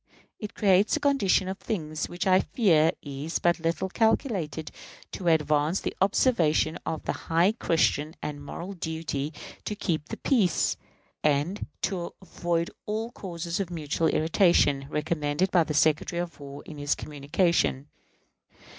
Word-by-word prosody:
It 210 +1 -7
creates 200 0 +4
a - - -4
condition 235 -10 +2
of 190 +1 -4
things 155 -7 -3
which 175 - -4
I 185 -1 +5
fear 165 -9 +3
is 145 +3 -3
but 175 0 +2
little 165 +3 -1
calculated 190 - 0 0.4
to 180 - -5
advance 155 +1 +2
the - - -3
observance 190 - +3 0.2
of 160 -1 -3
the - - -1
"high 170 +4 +2
Christian 160 - +1
and 145 -1 -5
moral 175 +6 -6
duty 160 -4 -3 0.3
to 210 - -3
keep 160 -7 -2
the - - -5
peace, 220 - +2 0.5
and 150 +7 +1 0.2
to 180 -4 -2
avoid 170 -2 -2 0.2
all 220 +2 -2
causes 170 -4 -5
of 195 -3 -2
mutual 160 -1 -1
irritation," 155 -5 +3
recommended 150 +3 0
by 175 -3 +5
the 155 -1 -4
Secretary 155 +3 +2
of 170 -4 -5
War 140 0 -9
in 150 -2 -9
his 145 0 +1
communication. 150 -1 0
165 Hz, 145 wpm, -27 LUFS, 150-190 Hz, 0.5 s, I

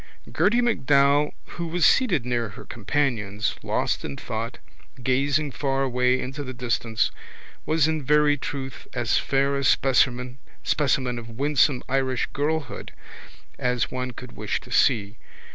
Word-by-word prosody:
Gerty 210 +9 +3
MacDowell 145 - +3
who 170 -1 -6
was 165 -1 +2
seated 175 - +3
near 120 -3 -1
her 95 - -11
companions, 110 -3 -1
lost - - -1
in 70 - -5
thought, 115 0 -4 0.5
gazing 140 +3 +1
far 135 0 -1
away 125 0 +2
into 135 +3 -5
the 130 -1 -7
distance 120 -2 0 0.6
was, 160 -1 +3
in 160 -1 0
very 150 +1 +4
truth, 135 -1 -6
as 120 -2 +2
fair 140 0 +1
a 140 - -1
specimen 125 -1 +2 0.8
of 115 0 -10
winsome 140 -2 +2
Irish 130 -1 0
girlhood 150 -1 -2 0.7
as 125 -2 0
one 125 0 -3
could 125 0 -9
wish - - -3
to - - -14
see. 105 +1 +2
135 Hz, 135 wpm, -25 LUFS, 125-145 Hz, 0.8 s, very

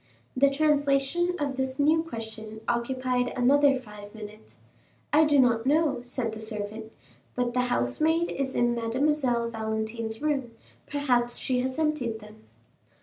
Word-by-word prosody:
The 275 +2 +5
translation 290 +3 +2
of 280 -2 -2
this 265 0 -2
new 310 +3 +3
question 220 -6 -7
occupied 250 +1 0
another 275 +3 +4
five 210 -3 -12
minutes. 215 0 -11 0.6
"I 310 +1 +6
do 295 -1 +3
not 240 -2 +3
know," 300 -2 +2
said 245 -2 -3
the 220 - -7
servant, 220 0 -5 0.4
"but 245 -1 -1
the 250 - +2
housemaid 320 +6 +1
is 270 -1 -3
in 240 0 +2
Mademoiselle 240 0 0
Valentine's 220 0 -3
room: 275 -5 -1 0.3
perhaps 250 -5 0
she 255 -2 0
has 260 +2 -2
emptied 300 -8 0
them." 215 0 -15
250 Hz, 140 wpm, -27 LUFS, 225-285 Hz, 0.6 s, I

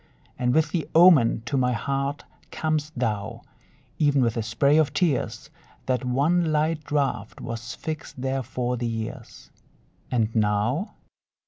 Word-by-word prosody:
And 125 0 +1
with 160 -1 +2
the 170 -3 -2
omen 160 -10 +6
to 135 +3 -1
my 125 -1 +2
heart 140 +5 -2 0.3
cam'st 155 -1 -2
thou. 110 -3 -2 0.6
Even 145 -3 +3
with 115 -2 +1
a 115 - -1
spray 125 +7 +2
of 155 -3 +2
tears 155 -9 -1 0.3
That 125 -2 0
one 155 +7 +2
light 155 +1 0
draft 140 -8 -2
was 115 0 -6
fixed 155 -4 -6
there 135 +1 -1
for 125 0 -3
the 120 0 -2
years. 115 -1 -6 0.6
And 115 -2 0
now? 110 - 0
130 Hz, 140 wpm, -25 LUFS, 115-150 Hz, 0.6 s, omen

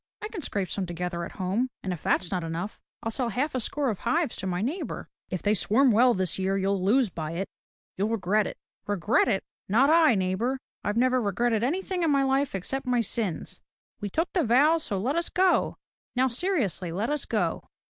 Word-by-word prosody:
" - - -66
I 425 - -3
can 420 -6 -6
scrape 200 -8 -2
some 195 -3 -2
together 175 0 -3
at - - -10
home, 200 +7 -1
and 185 - -1
if 170 - -7
that's 180 - +1
not 180 -2 -1
enough, 165 +5 -4 0.2
I'll 225 - -1
sell 240 +1 -1
half 265 +8 -1
a 255 - 0
score 275 +2 -1
of 200 - -5
hives 295 +3 0
to 190 - -4
my 180 +1 -1
neighbor." 305 - -3
" - - -53
If 185 - -4
they 205 - +3
swarm 240 +6 +4
well 240 +3 +5
this 185 -1 -1
year 190 +1 +1
you'll 195 -1 0
lose 225 +2 +3
by 160 -1 -4
it. 190 +4 -2 0.5
You'll 200 +3 +1
regret 210 -1 +1
it - - -7 0.2
!" - - -44
"Regret 205 +2 +2
it! 195 -5 +1 0.3
Not 260 +9 +5
I, 320 -6 +6
neighbor! 190 +8 0 0.3
I 205 - 0
never 255 +2 +3
regretted 225 +2 +1
anything 365 +6 -1
in 330 - +2
my 275 -1 +3
life 270 -2 +1
except 265 +8 -3
my 245 -1 +3
sins! 215 -5 -3 0.4
We 205 - -3
took 325 - -1
the 355 - +2
vows, 290 +7 +4
so 200 - -2
let 250 +10 0
us 340 0 0
go. 370 0 +2 0.4
Now 255 +1 +3
seriously, 240 - -1
let 205 - -1
us 300 - -1
go." - - -1
225 Hz, 220 wpm, -27 LUFS, 190-270 Hz, 0.5 s, I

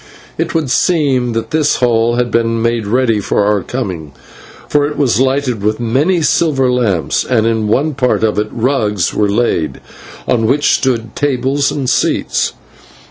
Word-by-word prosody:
It - - -3
would 155 -6 0
seem 135 -9 +1
that 115 +5 -4
this 155 -2 +2
hall 120 -1 +1
had 120 -1 -1
been 115 0 +1
made 115 -2 -1
ready 115 -1 +1
for 100 0 0
our 105 -1 +1
coming, 90 - -5 0.5
for 145 -1 +1
it 150 - -6
was 130 -5 +1
lighted 130 -4 0
with 105 +2 -1
many 145 +10 +1
silver 140 -6 +2
lamps, 110 -9 0
and 115 -3 +1
in 110 -2 0
one 145 +8 +1
part 125 -4 0
of 105 -2 +1
it 105 - -1
rugs 110 -7 -1
were 105 -1 +1
laid 100 -7 -1 0.5
and 125 - +1
on 110 - +1
them 140 +5 +1
stood 115 -7 0
tables 140 0 0
and 135 -3 -3
seats. 125 - 0
120 Hz, 170 wpm, -14 LUFS, 110-135 Hz, 0.5 s, this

